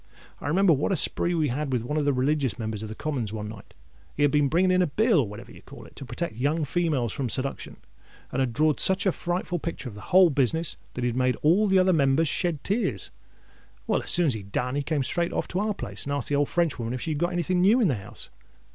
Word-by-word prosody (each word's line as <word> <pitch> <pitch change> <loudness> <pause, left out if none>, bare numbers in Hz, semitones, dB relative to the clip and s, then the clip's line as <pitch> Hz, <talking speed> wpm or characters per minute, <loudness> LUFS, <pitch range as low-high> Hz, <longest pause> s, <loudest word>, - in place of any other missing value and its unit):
I - - -6
remember 180 +3 +4
what 145 +7 0
a - - +2
spree 175 +2 +1
we 155 -3 +1
had 140 +3 -3
with 125 -3 0
one 150 +5 -3
of 150 -2 0
the 145 - +3
religious 135 0 0
Members 110 -3 -4
of 110 - -6
the 110 - -7
Commons 130 -8 -3
one 105 -1 -5
night. 105 -2 -11 0.4
He - - 0
had 145 - +4
been 145 -1 +3
bringing 180 +6 +2
in 185 0 +3
a 180 - +2
bill, 215 - +2
or 125 - +1
whatever 105 +1 -10
you - - -14
call - - -13
it, - - -17
to 135 - -7
protect 170 -3 -4
young 150 +5 0
females 145 -8 -1
from 130 -3 -3
seduction, 135 +4 -4 0.5
and 130 - -2
had 130 -2 +1
drawed 155 +4 +1
such 190 +3 +3
a 190 - +4
frightful 175 0 -3
picture 165 -4 -5
of 120 - -7
the 105 - -10
whole 185 -2 +6
business, 145 +4 0 0.2
that 125 - -3
he 120 - +1
made 125 +1 +1
all 185 +8 +4
the 190 -1 +3
other 185 0 +4
Members 140 +1 +2
shed 165 0 -1
tears. 215 +5 -2 0.7
Well, - - 0
as - - -7
soon 175 0 +6
as 140 - +2
he'd 100 -3 -8
done, 125 +4 -1
he 145 - 0
came 145 -1 -1
straight 170 +6 0
off - - -2
to 180 - -2
our 210 0 -1
place, - - -7
and 140 - -2
asked 140 -3 -2
the 145 - +1
old 145 0 +1
Frenchwoman 130 -9 -1
if 125 - -6
she 160 - -3
had 150 - -2
got 175 +2 0
any 175 0 0
thing 180 +2 0
new 210 +7 +5
in 225 - +3
the 145 - +1
house. 100 -4 -9
150 Hz, 270 wpm, -26 LUFS, 130-175 Hz, 0.7 s, whole